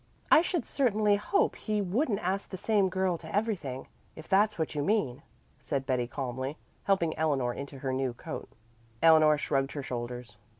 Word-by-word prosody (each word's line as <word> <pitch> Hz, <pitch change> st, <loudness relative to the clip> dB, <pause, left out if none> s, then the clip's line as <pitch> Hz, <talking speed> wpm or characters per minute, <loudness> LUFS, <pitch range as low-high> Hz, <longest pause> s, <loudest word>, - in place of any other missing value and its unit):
"I -, -, +8 dB
should 350 Hz, -1 st, -1 dB
certainly 215 Hz, -6 st, +2 dB
hope 300 Hz, -, +1 dB
he 215 Hz, -1 st, -2 dB
wouldn't 205 Hz, -, 0 dB
ask 190 Hz, +2 st, -2 dB
the 190 Hz, -, -6 dB
same 200 Hz, 0 st, +2 dB
girl 185 Hz, -2 st, 0 dB
to 160 Hz, +3 st, -7 dB
everything, 185 Hz, -, -2 dB, 0.3 s
if 160 Hz, -, -11 dB
that's 210 Hz, +2 st, +3 dB
what 160 Hz, -2 st, -2 dB
you 150 Hz, -, -1 dB
mean," 145 Hz, -, 0 dB, 0.4 s
said 140 Hz, -3 st, -2 dB
Betty 125 Hz, -3 st, 0 dB
calmly, 130 Hz, +2 st, -4 dB, 0.3 s
helping 170 Hz, -5 st, +2 dB
Eleanor 135 Hz, -6 st, +1 dB
into 140 Hz, +1 st, -7 dB
her 130 Hz, 0 st, -3 dB
new 130 Hz, -2 st, -1 dB
coat. -, -, -7 dB, 0.5 s
Eleanor 155 Hz, -2 st, +7 dB
shrugged 135 Hz, -2 st, -1 dB
her 145 Hz, -, -4 dB
shoulders. 120 Hz, -3 st, -6 dB
160 Hz, 170 wpm, -29 LUFS, 135-205 Hz, 0.5 s, I